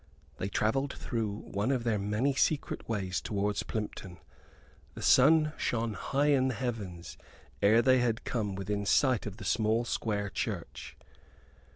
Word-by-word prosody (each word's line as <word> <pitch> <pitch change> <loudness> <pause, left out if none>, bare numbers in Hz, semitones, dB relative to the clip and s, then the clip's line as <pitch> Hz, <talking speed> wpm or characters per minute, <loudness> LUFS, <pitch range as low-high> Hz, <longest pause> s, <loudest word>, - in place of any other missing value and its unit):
They 95 - -3
travelled 135 +8 0
through 115 -4 -3
one 100 +5 -2
of 130 -3 0
their 115 -3 0
many 105 +8 0
secret 140 -1 -1
ways 95 -5 -2
towards 105 -1 -1
Plympton. 100 -4 -5 0.8
The - - -7
sun 155 +3 +5
shone 115 -2 -1
high 140 +9 0
in 130 -2 +3
the 130 - -1
heavens 100 -9 -5 0.4
ere 110 +4 +5
they 130 +1 +5
had 120 -2 0
come 105 -5 -2
within 100 +1 -2
sight 130 -3 +3
of 105 -1 -7
the 105 - -9
small 110 +3 +1
square 105 -3 -2
church. - - -5
110 Hz, 150 wpm, -30 LUFS, 100-130 Hz, 0.8 s, sun